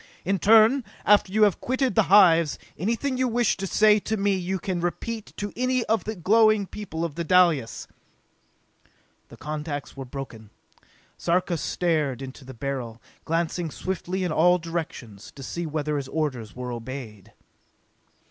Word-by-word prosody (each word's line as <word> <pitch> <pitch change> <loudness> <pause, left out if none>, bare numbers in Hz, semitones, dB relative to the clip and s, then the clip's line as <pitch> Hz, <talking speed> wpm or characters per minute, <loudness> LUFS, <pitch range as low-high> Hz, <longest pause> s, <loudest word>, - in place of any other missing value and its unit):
In 195 +1 0
turn, 225 - +5 0.2
after 205 -2 +4
you 215 +2 +3
have 205 -4 +3
quitted 260 +1 0
the 220 - +4
hives, 170 -6 +6 0.2
anything 235 - -1
you 260 - +2
wish 240 -1 +1
to 195 - -3
say 210 +2 +4
to 220 +2 -3
me 200 0 +1
you 185 +1 -2
can 185 -1 -3
repeat 215 +5 -4
to 205 0 -4
any 255 +1 +1
one - - -12
of 225 0 +1
the 220 - -3
glowing 215 +3 +4
people 175 -5 -5
of 165 - -5
Dalis!" 170 -6 +2 1.4
The - - -13
contacts 150 -1 -5
were 135 - -6
broken. 125 -5 -8 0.7
Sarka 175 +1 +1
stared 155 -6 -1
into 135 +1 -9
the 130 0 -11
Beryl, 125 -3 -4 0.3
glancing 165 +1 -1
swiftly 185 +6 -4
in 180 - -1
all 180 +3 +4
directions, 160 - -6
to 140 - -9
see 170 +5 -4
whether 150 -1 -2
his 140 -2 -4
orders 135 -8 -3
were 125 0 -5
obeyed. 120 -4 -8
170 Hz, 155 wpm, -25 LUFS, 140-210 Hz, 1.4 s, hives